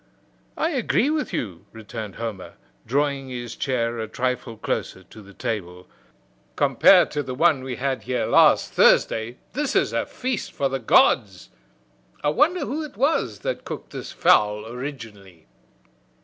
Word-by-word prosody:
"I 325 - 0
agree 265 0 +1
with 310 -1 -2
you," 90 -7 -5
returned 110 -2 -8
Homer, 110 -5 -6 0.3
drawing 140 +1 0
his 120 -2 -6
chair 120 -3 -1
a 110 - -3
trifle 125 0 -3
closer 95 - -3
to 110 +4 -14
the 100 -1 -15
table. 90 -4 -5 0.7
"Compared - - +5
to 150 - -1
the 130 -2 -6
one 155 -1 +3
we 130 -1 -4
had 130 +1 -2
here 125 0 -2
last - - +4
Thursday, 115 +3 +3 0.2
this 290 +1 -2
is - - +2
a - - -1
feast 255 -3 -4
for 140 - 0
the 135 0 -2
gods. 105 -4 +2 0.7
I 145 - +2
wonder 310 - +2
who 300 +4 -3
it 290 -9 -10
was 280 +7 0
that - - -3
cooked - - -8
this - - -7
fowl 105 0 +3
originally?" 110 - -9
125 Hz, 150 wpm, -23 LUFS, 110-150 Hz, 0.7 s, Compared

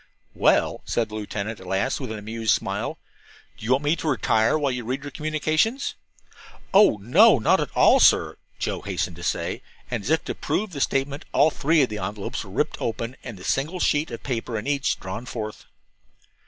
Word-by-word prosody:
"Well," - - +2
said 115 -2 -1
the - - -12
lieutenant 105 +1 -4
at 95 - -12
last, 95 +8 0
with 130 -5 -5
an 110 - -4
amused 110 +1 0
smile, - - -3 0.6
"do - - -14
you 125 - +3
want 135 +3 +1
me 145 +3 +2
to 160 - -4
retire 115 -2 +2
while 145 -3 0
you 125 -1 -3
read 130 +4 -3
your 145 - -7
communications?" 155 - 0 0.8
"Oh, 195 - +6
no, 165 - +6
not 110 - +3
at - - -2
all, - - +6
sir," - - +4 0.2
Joe - - -2
hastened 90 -3 -3
to - - -10
say, - - -2 0.3
and 120 -3 -1
as 120 - -4
if 160 +1 +2
to - - -3
prove 215 -1 -2
the 140 -4 -5
statement 140 +2 -1
all 155 - +5
three 155 +1 +3
envelopes 105 -3 -4
were - - -12
ripped - - -2
open 115 +2 -3
and 115 -5 -7
the 90 - -12
single 155 - -1
sheet 150 -2 +1
of 115 - -7
paper 115 -3 -3
in 105 - -5
each 140 -1 0
drawn 95 +6 -6
forth. 110 -3 -6
125 Hz, 195 wpm, -24 LUFS, 110-150 Hz, 0.8 s, Oh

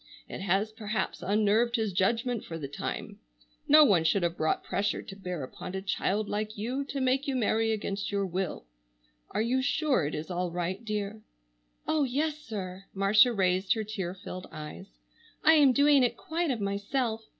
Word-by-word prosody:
It - - -7
has 195 +3 +1
perhaps 215 0 -3
unnerved 215 +4 +2
his 220 -5 0
judgment 230 +5 +1
for 165 - -6
the 145 -4 -5
time. 140 - -5 0.5
No 305 +1 +8
one 185 - +4
should 175 +4 +2
have 170 0 0
brought 155 -2 0
pressure 205 +1 -1
to 195 - -9
bear 180 -6 -5
upon 180 +7 -7
a 190 - -2
child 205 +1 0
like 215 +1 -3
you 250 +7 -2
to 280 0 -4
make 265 +2 +1
you 275 - 0
marry 225 -2 +1
against 200 -2 -3
your 200 -1 0
will. 185 - -3 0.6
Are 215 - 0
you 255 +3 +1
sure 275 - +1
it 150 - -4
is 155 +4 -5
all 180 0 -1
right, 180 +5 -3
dear?" 210 -1 -3 0.7
"Oh, 310 -2 +2
yes, 295 +4 -1
sir!" 195 -8 -6
Marcia 210 +5 +5
raised 190 -2 +2
her 220 - -2
tear 195 -4 -4
filled 185 -1 -8
eyes. 150 - -8 0.6
"I 320 - +7
am 290 -4 +6
doing 285 +1 +5
it 245 - +1
quite 335 +1 -2
of 250 -4 -1
myself. 220 +3 -1
210 Hz, 185 wpm, -29 LUFS, 190-245 Hz, 0.7 s, No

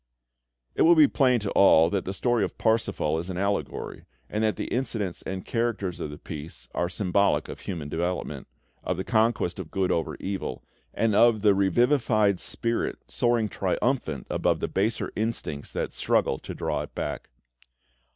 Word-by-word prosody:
It - - -1
will 170 +1 +7
be 155 -3 +7
plain 125 -4 +3
to 100 - -3
all 85 -4 +6
that 100 -2 -1
the 95 - -2
story 120 +1 +1
of - - -4
"Parsifal" 110 -8 +1
is 85 +3 -5
an 90 - -4
allegory, 100 +1 -2 0.3
and 105 +1 0
that 110 -1 +2
the - - -4
incidents 110 -8 -2
and 95 0 -4
characters 115 -6 -1
of - - -4
the 75 - -8
piece 75 -5 -8
are 85 - 0
symbolic 100 +1 +1
of - - -8
human 85 -6 -5
development, 85 +4 -3 0.4
of 90 - -2
the 95 - -2
conquest 110 -5 +1
of 85 -4 -6
good 95 -1 0
over 80 - -1
evil, 95 0 -4 0.3
and 115 -1 +1
of 110 0 +4
the 105 -2 +6
revivified 110 0 +3
spirit 115 0 -2
soaring 120 -2 +1
triumphant 95 - -1
above - - +1
the - - -1
baser 110 +4 -1
instincts 105 -10 -3
that - - -3
struggle 65 - +1
to - - -8
draw - - -2
it - - -9
back. - - -4
100 Hz, 170 wpm, -26 LUFS, 90-115 Hz, 0.4 s, will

